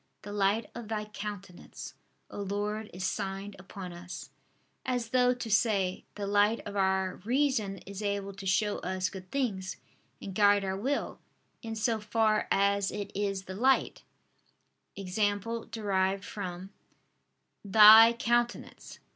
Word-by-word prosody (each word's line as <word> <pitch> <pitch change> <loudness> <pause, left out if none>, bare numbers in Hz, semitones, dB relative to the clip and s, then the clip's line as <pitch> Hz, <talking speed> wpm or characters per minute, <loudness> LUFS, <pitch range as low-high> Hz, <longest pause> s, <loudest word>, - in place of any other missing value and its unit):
The 205 0 -7
light 205 +2 +1
of 235 -2 -8
Thy 215 -1 -3
countenance, 205 -3 -8 0.4
O - - -6
Lord, 205 +2 -3
is 185 +1 -5
signed 195 +1 -3
upon 190 -1 -8
us": 175 0 -9 0.5
as 245 -3 -2
though 250 +1 +4
to 240 -3 -6
say: 200 -4 +1
"The 205 - -4
light 205 +3 +3
of 205 - -6
our 190 -1 +1
reason 230 -3 0
is 200 +1 -7
able 200 -1 -2
to 195 0 -8
show 205 +2 +1
us 185 0 -2
good 185 -1 -10
things, 195 -8 -2 0.4
and 195 - -7
guide 205 0 +4
our 190 0 -2
will, 265 +9 -2 0.4
in 225 -1 -5
so 220 +1 0
far 215 0 +1
as 200 0 +2
it 205 -1 -5
is 195 -1 -1
the 190 - -8
light 260 +7 +2 1.0
(i.e. 195 - -6 0.7
derived 195 -3 0
from) 185 -1 -6 0.9
Thy 220 +3 +9
countenance." 240 0 -2
205 Hz, 140 wpm, -30 LUFS, 195-220 Hz, 1.0 s, Thy